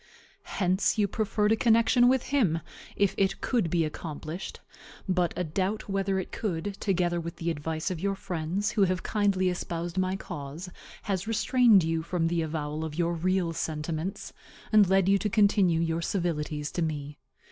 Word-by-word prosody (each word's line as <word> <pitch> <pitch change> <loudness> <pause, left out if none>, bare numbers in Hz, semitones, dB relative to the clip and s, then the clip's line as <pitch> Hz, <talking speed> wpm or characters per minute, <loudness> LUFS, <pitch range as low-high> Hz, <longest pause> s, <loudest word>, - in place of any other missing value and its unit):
Hence 185 +3 +2
you 210 -1 +3
preferred 210 +1 0
a - - +5
connection 230 +2 +4
with 260 0 +3
him, 195 - +2 0.3
if 200 -2 +2
it 195 -1 +1
could 230 -10 0
be 165 -1 +2
accomplished; 155 +2 -6 0.5
but 180 -2 +1
a 180 - 0
doubt 190 +6 -2
whether 195 -1 0
it 190 - -4
could, 195 -1 -3
together 175 -3 0
with 170 0 -6
the 170 0 -2
advice 160 +3 -3
of 175 - -4
your 195 +2 -1
friends, 185 +3 -2
who 210 -3 +3
have 185 0 -1
kindly 200 -3 +1
espoused 175 0 -3
my 185 0 0
cause, 150 0 -7 0.3
has 195 -1 -2
restrained 225 -2 +4
you 165 0 0
from 165 0 -1
the 170 -1 0
avowal 155 -1 -3
of 155 -1 -5
your 170 0 +1
real 175 0 0
sentiments, 160 +4 -4 0.4
and 210 -4 +6
led 190 -1 +3
you 195 0 +4
to 210 - -1
continue 195 -4 +3
your 165 0 0
civilities 155 -5 -2
to 175 - -3
me. 150 -2 -3
180 Hz, 170 wpm, -28 LUFS, 165-200 Hz, 0.5 s, and